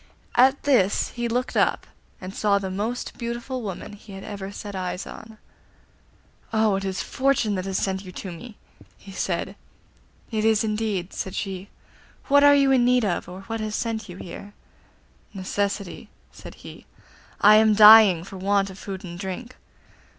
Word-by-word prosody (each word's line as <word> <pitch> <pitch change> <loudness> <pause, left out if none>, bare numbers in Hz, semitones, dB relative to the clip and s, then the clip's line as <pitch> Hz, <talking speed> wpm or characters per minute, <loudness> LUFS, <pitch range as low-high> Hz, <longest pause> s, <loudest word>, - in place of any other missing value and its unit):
At 265 +3 +4
this 235 -9 +2
he 240 -1 -3
looked 245 +2 -2
up, - - +1 0.3
and 185 +1 -8
saw 205 -1 +2
the 190 -1 -4
most 220 +6 -4
beautiful 240 +2 -4
woman 205 -1 -6
he 205 0 -13
had 195 0 -9
ever 200 -2 -7
set 205 0 -8
eyes 185 0 -4
on. 220 0 -11 1.1
'Oh, 220 -2 +2
it 195 - -4
is 190 0 -3
Fortune 265 -6 0
that 185 -1 -3
has 190 -1 -2
sent 190 0 -2
you 185 - -10
to 190 - -7
me,' 210 +6 -11 0.4
he 195 - -13
said. 190 0 -3 0.8
'It 215 -1 -1
is 220 -1 +3
indeed,' 210 -4 -2
said 190 - -5
she. 195 0 -5 0.6
'What 285 +1 +6
are 285 0 +7
you 275 -1 +4
in 255 -2 +4
need 250 -1 +3
of, 175 -2 -2
or 185 +2 -9
what 225 +3 -5
has 215 -1 -3
sent 225 -3 -3
you 180 - -9
here?' 200 +3 -10 0.8
'Necessity,' 200 0 -3 0.2
said - - -12
he. - - -12 0.5
'I 210 +1 +8
am 220 -1 +4
dying 210 -5 +8
for 195 +1 -10
want 195 +1 +1
of 190 - -12
food 190 -2 -7
and 175 -1 -8
drink. 205 +6 -6
205 Hz, 170 wpm, -24 LUFS, 190-225 Hz, 1.1 s, I